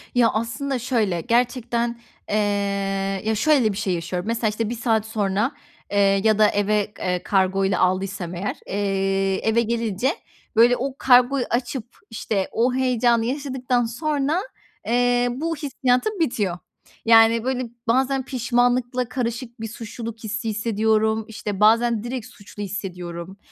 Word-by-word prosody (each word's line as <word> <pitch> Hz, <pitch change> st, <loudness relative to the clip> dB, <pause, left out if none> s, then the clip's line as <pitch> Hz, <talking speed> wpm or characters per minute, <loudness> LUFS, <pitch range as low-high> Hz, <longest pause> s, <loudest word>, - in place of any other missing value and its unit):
Ya, 235 Hz, -2 st, +5 dB
aslında 230 Hz, +4 st, -2 dB
şöyle, 220 Hz, -9 st, 0 dB
gerçekten, 235 Hz, 0 st, 0 dB, 0.3 s
eee, 210 Hz, -, 0 dB, 0.9 s
ya, 220 Hz, 0 st, +1 dB
şöyle 250 Hz, -3 st, +3 dB
bir 195 Hz, -, -6 dB
şey 195 Hz, -4 st, -1 dB
yaşıyorum. 180 Hz, +3 st, -3 dB
Mesela, 230 Hz, -1 st, 0 dB
işte, 215 Hz, +1 st, -2 dB
1 240 Hz, -, -3 dB
saat 225 Hz, -2 st, +1 dB
sonra, 215 Hz, +3 st, 0 dB, 0.4 s
eee, 205 Hz, -, 0 dB, 0.3 s
ya 215 Hz, -1 st, +3 dB
da 210 Hz, -, +7 dB
eve, 205 Hz, 0 st, 0 dB
eee, 180 Hz, -1 st, -1 dB
kargoyla 190 Hz, -1 st, +1 dB
aldıysam 185 Hz, -1 st, -1 dB
eğer, 190 Hz, +4 st, -3 dB
eee, 195 Hz, -1 st, 0 dB
eve 235 Hz, +1 st, +3 dB
gelince, 230 Hz, +2 st, 0 dB, 0.4 s
böyle, 235 Hz, +2 st, +6 dB
o 265 Hz, +1 st, -3 dB
kargoyu 250 Hz, +1 st, +4 dB
açıp, 240 Hz, 0 st, -2 dB, 0.2 s
işte, 210 Hz, -3 st, -2 dB
o 245 Hz, +2 st, +1 dB
heyecanı 240 Hz, -3 st, +2 dB
yaşadıktan 255 Hz, -2 st, -1 dB
sonra, 295 Hz, +6 st, -1 dB, 0.5 s
eee, 245 Hz, +1 st, +2 dB
bu 325 Hz, +6 st, -2 dB
hissiyatım 280 Hz, +6 st, 0 dB
bitiyor. 210 Hz, -, 0 dB, 0.5 s
Yani, 225 Hz, 0 st, +6 dB
böyle, 255 Hz, -2 st, -2 dB, 0.2 s
bazen 265 Hz, +2 st, +1 dB
pişmanlıkla 245 Hz, -1 st, 0 dB
karışık 240 Hz, -1 st, -4 dB
bir 225 Hz, -, -3 dB
suçluluk 225 Hz, 0 st, -7 dB
hissi 215 Hz, +1 st, -3 dB
hissediyorum. 220 Hz, 0 st, +1 dB
İşte, 210 Hz, -3 st, -5 dB
bazen 230 Hz, +1 st, +4 dB
direkt 240 Hz, -1 st, -4 dB
suçlu 205 Hz, +1 st, -10 dB
hissediyorum. 180 Hz, -2 st, -6 dB
230 Hz, 135 wpm, -23 LUFS, 205-245 Hz, 0.9 s, da